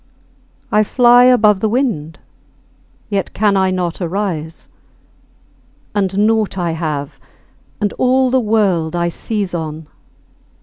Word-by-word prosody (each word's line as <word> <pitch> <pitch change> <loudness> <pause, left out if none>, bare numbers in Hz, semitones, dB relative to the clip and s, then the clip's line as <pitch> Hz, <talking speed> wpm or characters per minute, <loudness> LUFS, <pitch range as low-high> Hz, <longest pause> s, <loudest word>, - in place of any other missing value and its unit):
I 215 - +4
fly 245 +2 +5
above 210 -5 +4
the 220 - 0
wind, 210 - -2 0.9
yet 195 -2 -2
can 205 -1 +2
I 190 -1 +2
not 180 -1 -3
arise. 170 -3 -4 1.3
And 200 0 0
naught 220 -3 0
I 175 -2 -1
have, 155 -4 -4 0.6
and 205 -1 -1
all 255 0 +2
the 260 - +3
world 200 -8 0
I 170 0 0
seize 200 +1 -4
on. 160 -2 -5
195 Hz, 120 wpm, -16 LUFS, 170-220 Hz, 1.3 s, fly